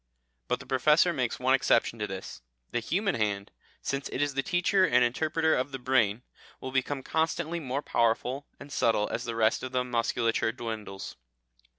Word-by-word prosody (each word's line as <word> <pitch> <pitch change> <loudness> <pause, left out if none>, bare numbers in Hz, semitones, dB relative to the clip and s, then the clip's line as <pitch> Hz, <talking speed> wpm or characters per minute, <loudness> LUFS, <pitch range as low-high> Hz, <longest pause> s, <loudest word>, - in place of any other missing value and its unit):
But - - 0
the - - -11
Professor 150 +6 +4
makes 125 -6 -1
one 130 +1 +3
exception 115 -3 +2
to 105 - -1
this. 95 -7 -7 0.3
"The 120 - 0
human 195 - 0
hand, 100 -2 -1 0.3
since 140 0 -2
it - - -4
is 145 0 +1
the 135 - +1
teacher 180 +4 +2
and 125 -8 +4
interpreter 160 +6 +1
of 130 +3 0
the 135 - -4
brain, 125 -4 +1 0.4
will 130 - -6
become 135 +1 -1
constantly 160 +2 -1
more 140 -1 -3
powerful 120 +4 0
and 140 0 -10
subtle 110 -2 +2
as 120 - -3
the 115 -1 -3
rest 110 -1 +2
of 130 0 -6
the 125 0 +2
musculature 115 -2 0
dwindles." 110 - -6
130 Hz, 180 wpm, -29 LUFS, 115-145 Hz, 0.4 s, Professor